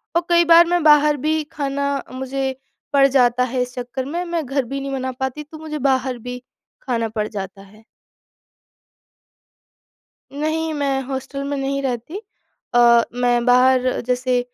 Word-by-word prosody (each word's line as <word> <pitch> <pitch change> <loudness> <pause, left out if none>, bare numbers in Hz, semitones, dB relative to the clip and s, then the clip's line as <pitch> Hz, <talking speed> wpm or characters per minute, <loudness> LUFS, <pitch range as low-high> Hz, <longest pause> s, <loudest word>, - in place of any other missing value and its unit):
और 340 - +4
कई 345 0 +5
बार 335 +1 +7
मैं 350 -1 +1
बाहर 300 -1 +5
भी 315 0 +1
खाना 280 -1 -2
मुझे 265 +1 -3 0.4
पड़ 275 -1 +6
जाता 250 -2 +3
है 250 0 -1
इस 250 0 -4
चक्कर 250 +1 -5
में 335 +6 -3
मैं 340 -3 -2
घर 270 +1 -1
भी 275 +3 -4
नहीं 275 - -5
बना 260 -1 -3
पाती, 265 +3 -4
तो 310 +2 -12
मुझे 305 -1 -6
बाहर 260 -2 0
भी 245 +1 -7 0.4
खाना 230 -3 -2
पड़ 215 -1 -2
जाता 195 -1 -7
है। 205 +3 -18 2.5
नहीं, 315 +2 -2
मैं 280 -2 -1
हॉस्टल 270 +1 -5
में 285 - -2
नहीं 275 0 -2
रहती 265 - -4 0.5
अ, 235 -1 +6
मैं 245 -1 +1
बाहर 255 0 +3
जैसे 250 0 +1
265 Hz, 155 wpm, -20 LUFS, 250-290 Hz, 2.5 s, बार